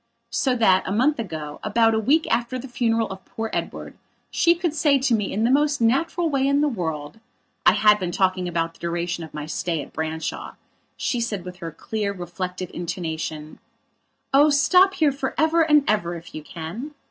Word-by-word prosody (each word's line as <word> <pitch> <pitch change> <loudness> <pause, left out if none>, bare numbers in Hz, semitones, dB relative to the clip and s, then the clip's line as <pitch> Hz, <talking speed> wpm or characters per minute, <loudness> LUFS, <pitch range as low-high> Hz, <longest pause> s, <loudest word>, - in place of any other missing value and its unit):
So 255 +2 +1
that, 190 -6 +4
a - - -2
month 255 +7 +2
ago, 155 -8 -5
about 225 +1 +3
a 220 - +2
week 290 +9 +3
after 240 +2 -1
the 255 +2 -7
funeral 230 -2 0
of 190 0 -8
poor 225 0 -5
Edward, - - -4 0.4
she 340 0 +4
could 340 -3 -1
say 290 -2 +3
to 265 -2 +1
me 210 -3 0
in 215 - -1
the 235 - +3
most 290 +1 +2
natural 330 +9 +1
way 275 -3 +1
in 280 +1 +3
the 300 - +3
worldI 160 - -4 0.5
had 210 +1 +5
been 180 -2 -2
talking 185 0 +1
about 165 -1 -1
the - - -22
duration 170 0 -3
of 160 - -9
my 150 -1 -6
stay 165 +1 -2
at - - -8
Branshawshe 160 +1 -4 0.6
said 210 -6 -3
with 180 0 -8
her 165 -2 -6
clear, 205 +4 -3
reflective 180 0 -5
intonation: 160 -3 -5 0.7
"Oh, 290 +3 +6
stop 365 +7 +4
here 305 -3 +3
for 270 -1 -4
ever 320 +2 +3
and 300 -3 +4
ever 175 -5 +1
if 170 0 -11
you 155 - -6
can." 180 - -7
215 Hz, 190 wpm, -23 LUFS, 175-275 Hz, 0.7 s, Oh